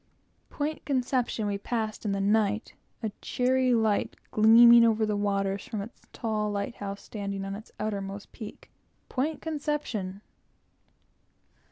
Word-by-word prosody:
Point 300 Hz, +1 st, -3 dB
Conception 250 Hz, -4 st, 0 dB
we 200 Hz, -1 st, -1 dB
passed 220 Hz, 0 st, -3 dB
in 205 Hz, -, +1 dB
the 195 Hz, -, -1 dB
night, 210 Hz, +1 st, +1 dB, 0.3 s
a 220 Hz, -, -1 dB
cheery 255 Hz, 0 st, +2 dB
light 220 Hz, -2 st, +1 dB, 0.2 s
gleaming 235 Hz, +2 st, +8 dB
over 220 Hz, -1 st, +3 dB
the 210 Hz, -1 st, 0 dB
waters 200 Hz, -1 st, 0 dB
from 215 Hz, -, -4 dB
its 205 Hz, +4 st, -8 dB
tar 215 Hz, -3 st, -1 dB
light 205 Hz, +3 st, -2 dB
house, 200 Hz, 0 st, -6 dB
standing 200 Hz, -2 st, -4 dB
on 195 Hz, -, -4 dB
its 215 Hz, +2 st, -9 dB
outermost 200 Hz, -1 st, -4 dB
peak. 215 Hz, -2 st, -10 dB, 0.4 s
Point 295 Hz, +4 st, -2 dB
Conception! 290 Hz, -, -3 dB
215 Hz, 135 wpm, -28 LUFS, 200-240 Hz, 0.4 s, gleaming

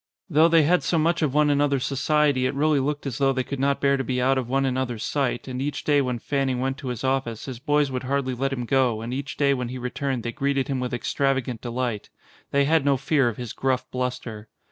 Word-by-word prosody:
Though 155 Hz, +2 st, +6 dB
they 165 Hz, -1 st, +5 dB
had 175 Hz, +4 st, +3 dB
so 170 Hz, -, 0 dB
much 165 Hz, +2 st, +1 dB
of 145 Hz, -3 st, 0 dB
one 150 Hz, -1 st, +4 dB
an 145 Hz, 0 st, +2 dB
other's 140 Hz, -2 st, +1 dB
society 145 Hz, -1 st, +2 dB
it 135 Hz, -, -3 dB
really 150 Hz, 0 st, +2 dB
looked 145 Hz, +2 st, -2 dB
as 135 Hz, -3 st, -4 dB
though 135 Hz, -1 st, +3 dB
they 130 Hz, -1 st, -1 dB
could 140 Hz, +1 st, -5 dB
not 140 Hz, +1 st, +1 dB
bear 140 Hz, 0 st, +3 dB
to 135 Hz, -, -2 dB
be 125 Hz, 0 st, -1 dB
out 130 Hz, +1 st, +2 dB
of 125 Hz, -2 st, -5 dB
one 135 Hz, +1 st, +1 dB
another's 125 Hz, -4 st, -2 dB
sight, 135 Hz, -2 st, -1 dB
and 130 Hz, 0 st, -4 dB
each 145 Hz, 0 st, -3 dB
day 145 Hz, -1 st, +3 dB
when 125 Hz, -2 st, -1 dB
Fanning 135 Hz, 0 st, -1 dB
went 135 Hz, +1 st, -2 dB
to 135 Hz, -, -7 dB
his 125 Hz, -1 st, -4 dB
office 130 Hz, -4 st, -1 dB
his 130 Hz, -4 st, -6 dB
boys 145 Hz, 0 st, +1 dB
would 130 Hz, -1 st, -2 dB
hardly 135 Hz, -1 st, -1 dB
let 135 Hz, +2 st, -1 dB
him 125 Hz, -2 st, -3 dB
go 125 Hz, -4 st, +1 dB
and 115 Hz, +2 st, -5 dB
each 140 Hz, +2 st, -5 dB
day 140 Hz, -1 st, +3 dB
when 125 Hz, -3 st, -3 dB
he 130 Hz, -, -5 dB
returned 125 Hz, 0 st, -3 dB
they 120 Hz, -, -3 dB
greeted 140 Hz, +1 st, -1 dB
him 135 Hz, -2 st, -1 dB
with 125 Hz, -1 st, -3 dB
extravagant 130 Hz, -1 st, -1 dB
delight. 120 Hz, -3 st, -3 dB, 0.4 s
They 140 Hz, 0 st, +2 dB
had 160 Hz, 0 st, +3 dB
no 140 Hz, -1 st, +3 dB
fear 135 Hz, -1 st, +2 dB
of 110 Hz, -, -7 dB
his 120 Hz, -3 st, -6 dB
gruff 130 Hz, -1 st, -1 dB
bluster. 125 Hz, -4 st, -4 dB
135 Hz, 255 wpm, -24 LUFS, 125-140 Hz, 0.4 s, Though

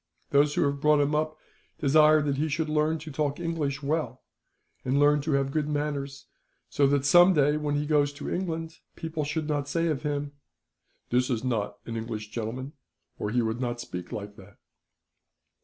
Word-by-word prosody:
Those 145 Hz, +1 st, +4 dB
who -, -, +3 dB
have 140 Hz, -1 st, -1 dB
brought 150 Hz, 0 st, +4 dB
him 145 Hz, +1 st, +1 dB
up 155 Hz, +1 st, 0 dB, 0.4 s
desire 155 Hz, +1 st, +5 dB
that 140 Hz, -2 st, -1 dB
he 155 Hz, +2 st, 0 dB
should 155 Hz, +2 st, -1 dB
learn 155 Hz, +1 st, +1 dB
to 155 Hz, 0 st, -9 dB
talk 145 Hz, +1 st, -1 dB
English 150 Hz, -5 st, -2 dB
well, 150 Hz, -3 st, -2 dB, 0.6 s
and 130 Hz, +2 st, +1 dB
learn 145 Hz, 0 st, +4 dB
to 150 Hz, +1 st, -1 dB
have 135 Hz, 0 st, +1 dB
good 150 Hz, 0 st, -1 dB
manners, 145 Hz, -2 st, -3 dB, 0.4 s
so 140 Hz, -1 st, +3 dB
that 140 Hz, 0 st, +1 dB
some 175 Hz, +5 st, +7 dB
day, 145 Hz, 0 st, +3 dB
when 150 Hz, -1 st, -1 dB
he 145 Hz, +1 st, 0 dB
goes 145 Hz, -1 st, +2 dB
to 145 Hz, -, -7 dB
England, 165 Hz, -3 st, -3 dB, 0.2 s
people 160 Hz, -1 st, -4 dB
should 150 Hz, +1 st, -2 dB
not 145 Hz, -2 st, -1 dB
say 165 Hz, +3 st, 0 dB
of 150 Hz, -4 st, -1 dB
him: 145 Hz, -1 st, -2 dB, 0.8 s
"'"This 125 Hz, +1 st, +2 dB
is 120 Hz, -2 st, -1 dB
not 105 Hz, -5 st, -2 dB
an 115 Hz, -, -5 dB
English 110 Hz, -2 st, -5 dB
gentleman, 125 Hz, +5 st, -5 dB, 0.5 s
or 105 Hz, -, -2 dB
he 120 Hz, +2 st, +1 dB
would 110 Hz, +2 st, -2 dB
not 120 Hz, -1 st, -2 dB
speak 90 Hz, -7 st, -7 dB
like 105 Hz, -1 st, -6 dB
that."' 100 Hz, +1 st, -15 dB
145 Hz, 190 wpm, -27 LUFS, 130-155 Hz, 0.8 s, some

